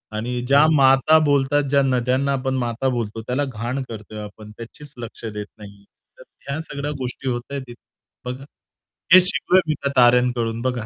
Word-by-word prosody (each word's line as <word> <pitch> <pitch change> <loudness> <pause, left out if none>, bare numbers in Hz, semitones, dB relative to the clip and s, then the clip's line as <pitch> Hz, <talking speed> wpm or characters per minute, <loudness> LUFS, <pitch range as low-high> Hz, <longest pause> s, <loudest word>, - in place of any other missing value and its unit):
आणि 120 +3 -3
ज्या 140 +3 +5
माता 135 +3 +5
बोलतात, 145 0 +2
ज्या 140 0 +3
नद्यांना 130 +2 0
आपण 130 0 -2
माता 120 +1 -2
बोलतो 115 -3 -3
त्याला 125 +5 -2
घाण 120 +5 -3
करतोय 110 -1 -9
आपण 105 +1 -11
त्याचीच 135 +5 -11
लक्ष 115 -1 -9
देत 105 -1 -5
नाहीये. 100 -1 -13 0.4
तर - - -12 0.2
ह्या 140 +3 -3
सगळ्या 145 -1 -5
गोष्टी 130 +1 -4
होताहेत. 125 +1 -5 0.5
बघा 125 +2 -6 0.7
हे 185 - +10
शिकलोय 185 +1 +2
मी 155 - +1
त्या 140 - 0
ताऱ्यांकडून 120 -2 +3
बघा. 125 -3 -2
125 Hz, 160 wpm, -21 LUFS, 115-140 Hz, 0.7 s, हे